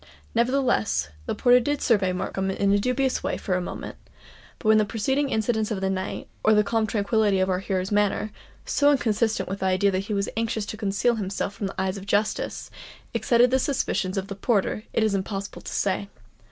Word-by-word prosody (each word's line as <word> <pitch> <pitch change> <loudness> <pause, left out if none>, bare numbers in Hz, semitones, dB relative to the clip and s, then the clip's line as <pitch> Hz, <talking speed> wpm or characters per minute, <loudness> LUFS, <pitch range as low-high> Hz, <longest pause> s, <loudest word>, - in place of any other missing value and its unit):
Nevertheless, 235 - +1 0.2
the - - -1
porter 245 0 +5
did 290 +4 -1
survey 200 -6 +2
Markham 190 +1 -2
in 195 +1 +1
a 205 - +3
dubious 255 +4 0
way - - -2
for 190 - -2
a 180 - +1
moment; 175 - -6 0.6
but 215 - -5
whether 220 0 +6
the 215 - +3
preceding 265 +7 0
incidents 220 -1 0
of 215 -4 -2
the 190 0 0
night, 190 0 -4 0.2
or 215 0 +5
the 210 - +5
calm 220 +1 0
tranquillity 205 -1 +1
of 185 0 +1
our 180 - 0
hero's 190 0 -2
manner,—so 210 +7 0
inconsistent 225 -4 +1
with 195 +1 -4
the 190 - 0
idea 190 +2 +3
that 190 +1 -1
he 210 - 0
was 200 0 0
anxious 225 -1 -1
to 215 - -6
conceal 215 +3 0
himself 200 0 -3
from 200 - -3
the 195 - -7
eyes 190 +1 -1
of 195 0 -9
justice,—excited 230 +3 0
the 260 - +3
suspicions 205 -8 -1
of 195 0 -2
the 200 - -5
porter, 210 +1 0
it 225 - +1
is 215 -2 +2
impossible 195 +1 -4
to - - -8
say. 200 0 -1
205 Hz, 200 wpm, -25 LUFS, 195-230 Hz, 0.6 s, whether